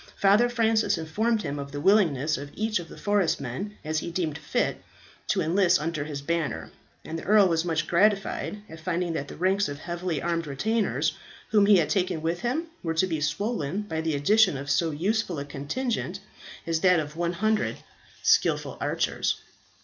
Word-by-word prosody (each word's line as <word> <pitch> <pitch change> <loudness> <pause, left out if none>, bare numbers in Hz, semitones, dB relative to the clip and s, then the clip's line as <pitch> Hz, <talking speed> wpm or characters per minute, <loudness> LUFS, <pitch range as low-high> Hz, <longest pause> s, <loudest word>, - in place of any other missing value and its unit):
Father 205 +5 +4
Francis 225 -4 +2
informed 210 +8 0
him 145 -2 -3
of 140 0 -6
the 145 - -4
willingness 155 -6 +3
of 140 +1 -6
such 215 -1 0
of 170 - -9
the - - -11
forest 205 -4 +1
men 165 - -5
as 155 0 0
he 170 - -5
deemed 170 -4 -2
fit - - -1 0.5
to - - +1
enlist 180 +2 +3
under 155 -1 -2
his 145 -2 -6
banner; 170 -1 -2 0.3
and 165 +1 -4
the - - -9
earl 205 0 +5
was 165 -2 +1
much 165 -2 0
gratified 205 +3 +1
at 160 - -11
finding 175 +1 -1
that 140 -3 -3
the - - -9
ranks 190 +2 +1
of 145 - -5
heavily 175 0 -3
armed 165 +1 -1
retainers 215 +11 0 0.4
whom 205 -2 +5
he 205 -2 +7
would 160 - +1
take 185 -3 +2
with 165 +2 -1
him, 260 - -1 0.2
were 165 -1 -2
to 160 - +3
be 160 -4 -2
swollen 195 +2 -1
by 160 -6 -3
the 160 -2 -1
addition 185 +3 +4
of 140 +1 -4
so 165 +4 +2
useful 180 +3 -1
a 140 - -4
contingent 180 - -3 0.5
as 165 -1 0
that 180 -1 +4
of 150 0 -5
100 180 +6 0 0.5
skilful - - +2
archers. - - 0
170 Hz, 185 wpm, -26 LUFS, 155-205 Hz, 0.5 s, he